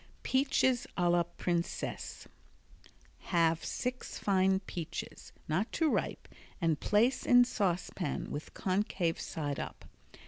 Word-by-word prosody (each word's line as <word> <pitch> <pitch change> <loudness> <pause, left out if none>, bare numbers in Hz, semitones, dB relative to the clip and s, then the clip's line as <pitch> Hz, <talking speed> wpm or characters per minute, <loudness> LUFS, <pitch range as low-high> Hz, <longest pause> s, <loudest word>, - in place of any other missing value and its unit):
Peaches 260 -2 +2
a 175 -1 +3
la 175 0 +4
Princesse 170 0 -3 1.0
Halve 165 -2 +2
six 250 0 -3
fine 190 -1 +3
peaches, 170 -4 -6 0.2
not 185 +9 0
too 320 -3 +2
ripe, - - -1 0.3
and 165 -5 +1
place 230 +5 +3
in 245 0 +7
saucepan 180 - -1
with 145 +2 -6
concave 185 -3 0
side 145 -3 -3
up. - - -6
185 Hz, 110 wpm, -32 LUFS, 170-230 Hz, 1.0 s, in